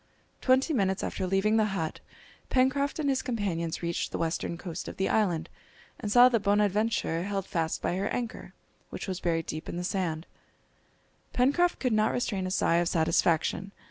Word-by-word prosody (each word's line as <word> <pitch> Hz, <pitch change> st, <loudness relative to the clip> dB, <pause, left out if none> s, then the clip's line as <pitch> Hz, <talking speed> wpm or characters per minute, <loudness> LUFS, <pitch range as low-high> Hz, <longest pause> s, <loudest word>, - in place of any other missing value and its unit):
Twenty 260 Hz, +5 st, +3 dB
minutes 190 Hz, -6 st, +1 dB
after 185 Hz, -, -2 dB
leaving 195 Hz, +4 st, +2 dB
the 215 Hz, -, +4 dB
hut 160 Hz, -1 st, -3 dB, 0.5 s
Pencroft 270 Hz, +2 st, +2 dB
and 305 Hz, -2 st, -1 dB
his 270 Hz, -1 st, +1 dB
companions 190 Hz, -10 st, -2 dB
reached 170 Hz, 0 st, -2 dB
the -, -, -3 dB
western 165 Hz, +1 st, -2 dB
coast 175 Hz, -1 st, -6 dB
of -, -, -7 dB
the 190 Hz, -, +1 dB
island, 180 Hz, -7 st, +1 dB, 0.5 s
and 210 Hz, -3 st, -4 dB
saw 245 Hz, +3 st, +8 dB
the 240 Hz, -2 st, +2 dB
Bonadventure 205 Hz, -3 st, +1 dB
held 195 Hz, -1 st, -2 dB
fast 165 Hz, -3 st, -2 dB
by -, -, 0 dB
her 195 Hz, +2 st, -1 dB
anchor, 240 Hz, -2 st, -5 dB, 0.3 s
which -, -, -6 dB
was 185 Hz, -2 st, -3 dB
buried 165 Hz, -3 st, 0 dB
deep 155 Hz, +1 st, -5 dB
in -, -, -4 dB
the 175 Hz, -, -3 dB
sand. 175 Hz, -3 st, -2 dB, 1.1 s
Pencroft 285 Hz, +8 st, +3 dB
could 255 Hz, -4 st, 0 dB
not 215 Hz, 0 st, +2 dB
restrain 200 Hz, -6 st, -1 dB
a -, -, -3 dB
sigh 170 Hz, -3 st, +2 dB
of 175 Hz, 0 st, +2 dB
satisfaction. 165 Hz, +3 st, +1 dB
195 Hz, 175 wpm, -28 LUFS, 170-230 Hz, 1.1 s, saw